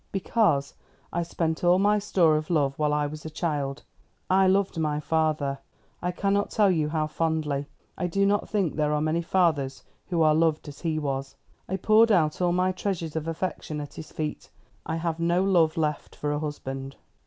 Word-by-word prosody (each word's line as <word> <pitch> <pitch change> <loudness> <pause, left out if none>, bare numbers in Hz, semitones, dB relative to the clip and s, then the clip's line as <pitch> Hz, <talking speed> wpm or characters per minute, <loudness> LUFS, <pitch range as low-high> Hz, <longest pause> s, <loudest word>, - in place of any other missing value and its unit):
"Because 195 -8 +1 0.4
I 175 - 0
spent 165 -1 -2
all 175 +1 +5
my 205 +2 +3
store 175 -6 +3
of 155 0 -2
love 145 -5 +2
while 150 -1 +2
I 150 0 +1
was 150 +1 -6
a 160 - -5
child. 150 -3 -2 0.5
I 190 0 +5
loved 190 -2 +2
my 150 -2 0
father 150 -3 0 0.4
ah, - - -6
I - - +1
cannot 200 +2 0
tell 205 -3 +3
you 155 -4 +1
how 155 -1 0
fondly. 155 -3 -1 0.3
I 180 - 0
do 195 +3 +1
not 205 +1 +1
think 195 -7 0
there 150 -1 +1
are 150 - +1
many 155 +2 0
fathers 155 -8 +1 0.2
who 170 -3 +1
are 155 -1 +5
loved 160 -1 +1
as 145 -1 -10
he 160 -2 -1
was. 135 -2 -3 0.3
I 190 - -1
poured 220 +4 +5
out 160 -4 +2
all 175 -1 +3
my 180 +1 +2
treasures 180 -4 -3
of 160 0 -3
affection 165 -2 -3
at 145 -1 -7
his 155 - -9
feet. 155 -1 -4 0.4
I 160 - -1
have 165 0 -2
no 170 +2 +2
love 170 -5 +3
left 150 -2 -2
for 145 - -2
a 145 - -1
husband." 135 -3 -5
160 Hz, 200 wpm, -26 LUFS, 150-180 Hz, 0.5 s, all